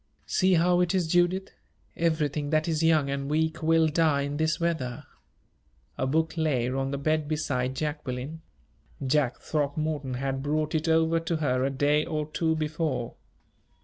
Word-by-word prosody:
"See 185 -1 +3
how 175 +1 +3
it 180 +1 +1
is, 180 -2 +2
Judith 175 +3 +1 0.4
everything 155 -3 0
that 155 +1 +1
is 160 -2 0
young 155 -4 +3
and 140 0 -3
weak 160 +1 0
will 160 0 +4
die 155 -2 +2
in 145 +1 -3
this 160 0 0
weather." 160 -8 -2 0.9
A 130 - -1
book 160 +4 +1
lay 140 -7 +1
on 135 +1 -1
the 140 - -2
bed 155 +1 0
beside 130 -4 -1
Jacqueline 150 0 -4 0.6
Jack 130 -2 +1
Throckmorton 145 -2 -2
had 135 +1 -2
brought 150 +2 -1
it 160 +1 0
over 160 +1 +3
to 165 +1 -2
her 130 -5 0
a 135 - +1
day 145 +2 +2
or 155 -1 -2
two 160 0 +1
before. 150 -5 -2
155 Hz, 160 wpm, -27 LUFS, 140-160 Hz, 0.9 s, will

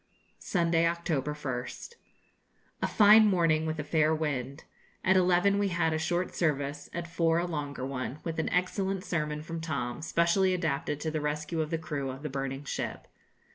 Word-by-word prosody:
Sunday, 170 -2 +2
October 160 -4 -1
1st. 135 - -5 0.9
A - - +1
fine 215 +1 +7
morning, 165 -5 +2
with 155 0 -2
a - - -1
fair 155 +1 +2
wind. 140 -4 -3 0.4
At 190 - +4
eleven 185 +2 +4
we 205 - +2
had 170 -3 +1
a 160 - 0
short 175 +3 -1
service, 145 -3 -1
at 170 0 -4
four 165 -1 +1
a 170 - +1
longer 145 -6 -4
one, 135 +1 -4
with 165 -1 -3
an 160 - 0
excellent 190 +1 0
sermon 150 -5 -2
from 165 +1 -5
Tom, 140 -5 -3
specially 170 +3 +2
adapted 150 -4 -1
to 160 - -2
the 155 -1 -2
rescue 150 +2 -2
of 155 - -2
the 165 - 0
crew 150 -4 -4
of 135 +2 -7
the 150 - -3
burning 135 0 -4
ship. 140 - -4
160 Hz, 175 wpm, -29 LUFS, 145-175 Hz, 0.9 s, fine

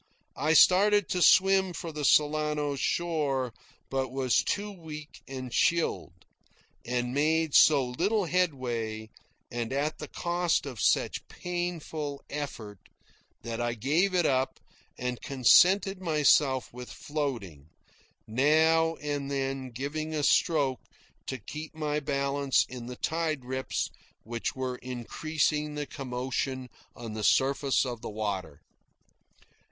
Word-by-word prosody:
I 155 +3 +2
started 200 +4 +6
to 180 - 0
swim 190 0 +5
for 165 0 -6
the 150 -1 -5
Solano 150 0 +2
shore, 140 -5 -1 0.4
but 135 -1 -1
was 130 -2 +2
too 205 +1 -2
weak 155 -5 -10
and 130 -2 -6
chilled, 160 - 0 0.6
and 125 0 -2
made 155 +2 +1
so 145 -4 +6
little 190 - 0
headway, 120 -11 -1 0.4
and 120 0 -3
at 145 +3 -1
the - - -6
cost 175 -2 0
of 125 -6 -6
such - - +1
painful 165 -5 -4
effort, 115 -9 -6 0.6
that 115 0 -4
I 120 0 -1
gave 160 - +1
it 175 -2 +3
up 130 -1 0 0.4
and 125 -1 -3
contented 185 - +4
myself 145 -6 +3
with 125 0 -8
floating, 115 - -5 0.6
now 160 +7 +3
and 145 -2 -4
then 135 -1 -2
giving 150 +6 -4
a 150 - -1
stroke 140 -4 +2 0.5
to 130 - -3
keep 155 +8 -8
my 150 -1 -1
balance 140 -1 +1
in 120 -2 -8
the 125 - -6
tide 160 -5 -2
rips 130 +1 -2 0.3
which 115 +2 -4
were 130 -1 -3
increasing 150 +5 -2
their 150 0 -3
commotion 130 -1 -4 0.3
on 115 -2 -7
the 110 0 -4
surface 135 +2 +2
of 120 -3 -5
the - - -5
water. 100 -8 -4
140 Hz, 125 wpm, -28 LUFS, 125-160 Hz, 0.6 s, started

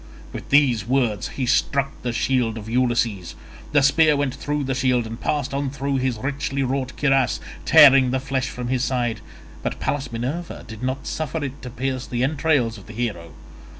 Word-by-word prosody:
With - - -8
these 125 -7 +3
words 120 -7 +1
he 130 - 0
struck 135 +2 +1
the 120 - -2
shield 115 -2 0
of 110 -1 -8
Ulysses. 115 -6 0 0.4
The 145 -2 +4
spear 150 +2 +4
went 140 -3 0
through 145 0 -2
the 135 0 -1
shield 125 -2 +1
and 115 +1 -7
passed 145 0 -1
on 140 0 -1
through 140 0 -2
his 130 -3 -1
richly 135 +2 -2
wrought 130 0 -2
cuirass, 135 -5 +2 0.3
tearing 135 -3 +7
the 130 +1 0
flesh 135 0 -2
from 125 -1 -5
his 130 -1 0
side, 120 -5 -1 0.4
but - - -4
Pallas 140 -3 -2
Minerva 135 +9 -4
did 110 -1 -9
not 130 +1 -3
suffer 155 0 -3
it 140 0 -6
to 125 - -7
pierce 130 +1 -3
the 120 0 -1
entrails 135 -5 +1
of 95 - -16
the 115 - -9
hero. 100 -9 -4
130 Hz, 185 wpm, -22 LUFS, 120-140 Hz, 0.4 s, tearing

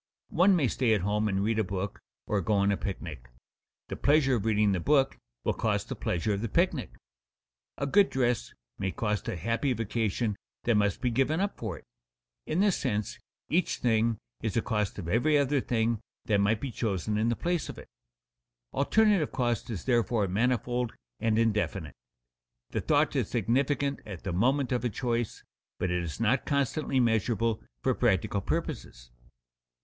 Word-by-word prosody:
One 185 +3 +5
may 150 -7 +2
stay 115 -1 +2
at 100 - -1
home 105 +3 +1
and 100 -1 0
read 110 +1 +1
a - - +3
book 100 +1 -4 0.3
or 105 -2 0
go 105 - 0
on 100 0 +3
a - - +2
picnic; 80 - -6 0.6
the - - -4
pleasure 145 -2 +3
of 105 - -4
reading 105 -2 +3
the 95 - 0
book 135 - +3 0.3
will - - +1
cost - - -1
the - - -3
pleasure 90 +5 -1
of 100 - -2
the 115 - -2
picnic. 140 - 0 0.8
A 140 - -1
good 195 +8 +4
dress 125 -4 0 0.3
may 95 -1 -1
cost 105 0 -2
a - - -2
happy 115 - 0
vacation 110 -1 -1 0.3
that 120 - +2
must 105 +1 +1
be 125 -2 +1
given 135 +7 +1
up 200 +1 -1
for 105 -8 -5
it. - - -15 0.6
In 160 +5 +1
this 205 -3 +3
sense, 105 -6 -2 0.3
each 175 +2 +1
thing 115 -1 +2 0.2
is 110 -2 -1
a 115 - +2
cost 105 -2 -1
of 95 -5 -5
every 135 - +3
other 140 -1 +2
thing 115 -2 0 0.3
that 100 -2 +2
might 110 +2 +2
be 135 - -3
chosen 105 -3 -1
in 110 +2 +2
the 120 - +1
place 175 +2 -1
of - - -7
it. - - -11 0.9
Alternative 200 +3 +3
cost 120 -1 -1
is 100 -8 -5
therefore 120 -4 +2
manifold 120 +3 0 0.2
and 110 0 +1
indefinite. 105 - 0 0.8
The - - -1
thought - - +2
is - - 0
significant 140 +5 +1
at 95 -6 -8
the 95 - -3
moment 130 +7 +2
of 125 -2 0
a 120 - +1
choice, 120 +1 -2 0.3
but 90 - -1
it 90 0 0
is 85 -3 -5
not 115 +3 +1
constantly 140 0 +1
measurable 115 -1 +1 0.2
for - - +3
practical - - +1
purposes. - - -4
115 Hz, 180 wpm, -29 LUFS, 100-130 Hz, 0.9 s, One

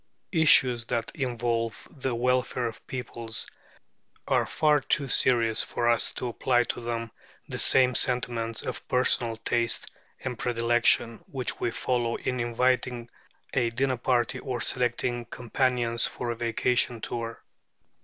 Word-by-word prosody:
Issues 130 -8 +4
that 115 -1 -2
involve 120 -4 -2
the 130 -4 -3
welfare 125 +1 0
of 115 -2 -6
peoples 115 -3 -4 0.8
are - - +2
far 150 -1 +3
too 140 +1 +1
serious 115 -3 +2
for 120 - -1
us 115 -4 +3
to 125 - -4
apply 120 +1 +2
to 120 - -4
them 115 -1 -4 0.4
the - - -5
same 130 -1 +5
sentiments 120 -3 +1
of - - -5
personal 120 -2 +2
taste 115 +1 -1 0.3
and 125 -3 -4
predilection 115 -1 +2
which 130 -3 -3
we - - 0
follow 120 -1 -1
in 125 -1 -3
inviting 120 0 0 0.4
a 120 -2 +2
dinner 130 +2 0
party, 125 +1 0
or 125 -2 -4
selecting 120 +1 -1
companions 120 -1 0
for 120 -1 -4
a - - -3
vacation 120 +1 0
tour. 115 0 -5
120 Hz, 135 wpm, -27 LUFS, 115-125 Hz, 0.8 s, same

